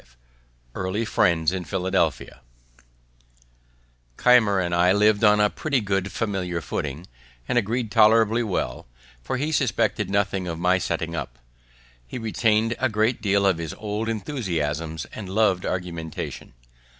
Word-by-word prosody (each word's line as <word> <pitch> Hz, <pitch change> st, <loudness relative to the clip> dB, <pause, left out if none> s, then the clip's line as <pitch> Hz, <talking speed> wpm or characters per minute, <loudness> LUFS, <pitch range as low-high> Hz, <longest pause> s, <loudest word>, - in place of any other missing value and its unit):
V -, -, -28 dB, 0.7 s
EARLY 95 Hz, +5 st, -2 dB
FRIENDS 85 Hz, -6 st, +2 dB
IN 95 Hz, -1 st, -3 dB
PHILADELPHIA 90 Hz, -10 st, -1 dB, 1.8 s
Keimer 115 Hz, -6 st, +4 dB
and 85 Hz, -1 st, -1 dB
I 90 Hz, +1 st, +4 dB
liv'd 105 Hz, +2 st, +3 dB
on 105 Hz, -1 st, +5 dB
a 105 Hz, 0 st, +3 dB
pretty 145 Hz, -4 st, -1 dB
good 100 Hz, -2 st, -1 dB
familiar 95 Hz, -6 st, -2 dB
footing, 75 Hz, +1 st, -4 dB, 0.4 s
and -, -, -1 dB
agreed 115 Hz, 0 st, 0 dB
tolerably 110 Hz, +1 st, +4 dB
well, 95 Hz, -, -3 dB, 0.4 s
for 130 Hz, -, -2 dB
he 150 Hz, +4 st, -2 dB
suspected 110 Hz, -, 0 dB
nothing 100 Hz, -2 st, 0 dB
of 85 Hz, -1 st, -4 dB
my 90 Hz, +2 st, +2 dB
setting 85 Hz, -1 st, -3 dB
up. 65 Hz, -6 st, -5 dB, 0.7 s
He -, -, -6 dB
retained 115 Hz, 0 st, +1 dB
a 130 Hz, -, +1 dB
great 110 Hz, +2 st, 0 dB
deal 100 Hz, -1 st, +2 dB
of 95 Hz, -4 st, +2 dB
his 85 Hz, +3 st, -5 dB
old 105 Hz, +2 st, -3 dB
enthusiasms 85 Hz, -, -3 dB
and 100 Hz, -4 st, -7 dB
lov'd 95 Hz, -2 st, +1 dB
argumentation. 85 Hz, -3 st, -5 dB
100 Hz, 140 wpm, -24 LUFS, 85-110 Hz, 1.8 s, on